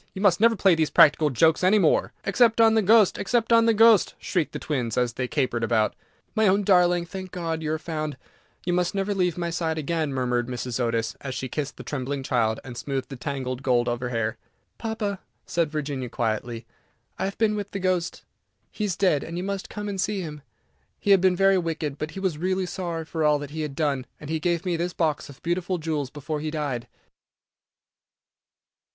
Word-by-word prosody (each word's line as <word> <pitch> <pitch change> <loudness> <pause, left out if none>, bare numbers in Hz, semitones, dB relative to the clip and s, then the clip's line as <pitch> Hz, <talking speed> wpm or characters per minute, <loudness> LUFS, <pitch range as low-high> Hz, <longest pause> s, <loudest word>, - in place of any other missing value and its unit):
You 190 - -5
must 185 -4 +4
never 230 +1 +5
play 195 -3 +4
these 160 -2 +1
practical 150 0 +5
jokes 160 +6 +3
any 190 +4 +5
more." 175 -7 +3
"Except 230 +3 +3
on 225 -1 +6
the 220 - +4
Ghost! 215 0 +5
except 230 +2 +1
on 230 0 +5
the 230 - +5
Ghost!" 225 -2 +5
shrieked 175 -6 -1
the - - -5
twins, 125 -7 -2
as 125 -1 +1
they 125 0 -2
capered 125 -4 -1
about. 110 -2 +2 0.4
"My 220 -1 +3
own 200 +2 +3
darling, 180 -2 +4
thank 185 +1 -7
God 165 -3 -3
you 155 -1 -2
are - - 0
found; 155 -3 -4 0.5
you 175 - 0
must 180 +1 0
never 195 +1 0
leave 180 -4 0
my 170 -1 -2
side 160 -1 -1
again," 155 -1 -1
murmured 125 -2 0
Mrs. 125 -1 -4
Otis, 115 -2 -1
as 135 -2 -5
she 130 - -3
kissed 145 +3 -4
the - - -8
trembling 135 0 -3
child, 115 -4 +1
and 125 -2 -9
smoothed 135 +1 -4
the 135 - -6
tangled 130 -1 -4
gold 125 -3 +2
of 120 0 -1
her 125 0 -3
hair. 115 -1 -1 0.4
"Papa," 215 -4 -3 0.3
said 170 -3 0
Virginia, 140 -4 -3
quietly, 115 0 -2 0.5
"I - - 0
have 195 - -4
been 215 -1 +2
with 205 -1 -4
the 200 - -5
Ghost. 185 -3 -1 0.5
He 210 - -3
is 190 -5 -1
dead, 180 -8 +2
and 165 +1 -6
you 180 - -3
must 195 0 -4
come 210 0 -5
and 195 -2 -2
see 205 -1 -1
him. 150 -3 -7 0.6
He 205 - +1
had 195 -2 +6
been 185 -1 +4
very 195 0 +4
wicked, 160 -4 -3
but 155 - -3
he - - -2
was 185 -6 -1
really 185 +2 0
sorry 170 -2 -4
for 160 0 -3
all 150 -1 +4
that 145 -1 -7
he 160 +1 -4
had 150 -3 -4
done, 140 -5 -1
and 150 +1 -7
he 160 - 0
gave 175 +2 -1
me 175 -2 0
this 175 +1 -2
box 155 -4 -1
of 140 - -14
beautiful 175 +2 -1
jewels 155 -4 -2
before 150 +2 -5
he 155 +1 -3
died." 145 -6 -3
160 Hz, 215 wpm, -25 LUFS, 135-190 Hz, 0.6 s, on